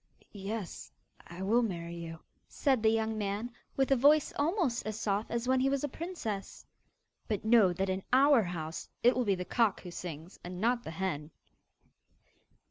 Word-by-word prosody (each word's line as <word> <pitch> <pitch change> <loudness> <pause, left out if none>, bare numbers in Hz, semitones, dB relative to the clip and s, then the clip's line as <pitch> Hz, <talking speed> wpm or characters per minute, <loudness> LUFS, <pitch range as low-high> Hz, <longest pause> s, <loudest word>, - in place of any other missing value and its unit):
'Yes, 205 -1 -6 0.4
I 175 +2 -7
will 225 +5 +3
marry 170 -6 -3
you,' 165 -1 -7 0.3
said 265 -5 +1
the 220 - +5
young 220 0 0
man, 205 +4 -2 0.3
with 270 0 +2
a - - +7
voice 290 +4 +4
almost 305 - +1
as 215 0 -3
soft 205 0 -1
as 235 +1 -2
when 260 0 +3
he 265 +1 +3
was 275 0 0
a - - +1
princess. 275 - -5 0.6
'But 215 -2 -2
know 220 -5 +6
that 190 +2 -1
in 190 0 -1
OUR 270 0 +6
house, 165 -4 -5
it 245 +2 +6
will 250 - +1
be 200 -2 +2
the 180 0 -5
cock 225 -2 +1
who 180 - -8
sings 170 0 -7
and 180 0 -6
not 240 +3 +1
the - - -6
hen! 160 -3 -3
215 Hz, 180 wpm, -31 LUFS, 185-250 Hz, 0.6 s, a